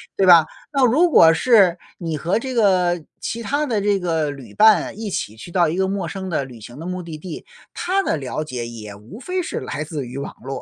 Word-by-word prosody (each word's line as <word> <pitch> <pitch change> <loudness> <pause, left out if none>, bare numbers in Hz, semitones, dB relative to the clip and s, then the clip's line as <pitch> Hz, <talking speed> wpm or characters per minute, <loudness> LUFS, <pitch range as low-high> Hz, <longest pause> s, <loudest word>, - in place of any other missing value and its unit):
对 195 - +2
吧？ 170 -3 +8 0.3
那 275 -3 +3
如 315 +9 +4
果 165 - +7
是 195 -4 +4 0.2
你 165 -3 -4
和 175 +9 0
这 260 +1 -5
个 180 -6 +2 0.2
其 230 +2 -4
他 285 +7 0
的 220 -6 -1
这 200 -1 +1
个 160 -4 -1
旅 125 -7 -11
伴 215 -1 +4
一 220 -2 -4
起 110 - -4
去 170 +10 -11
到 175 -2 +3
一 160 - -2
个 190 +1 0
陌 195 -4 -2
生 190 +2 -6
的 140 -5 -1
旅 120 -4 -12
行 120 +6 -11
的 165 - -7
目 180 0 -4
的 160 -2 -7
地， 170 +1 -8 0.3
他 385 +2 0
的 - - 0
了 145 +1 -4
解 125 -5 -5
也 110 -3 -9
无 110 - -12
非 365 +6 -3
是 - - -4
来 155 - -4
自 150 -4 -5
于 130 +3 -8
网 140 - -5
络， 135 +1 -6
175 Hz, 255 characters per minute, -21 LUFS, 145-210 Hz, 0.3 s, 吧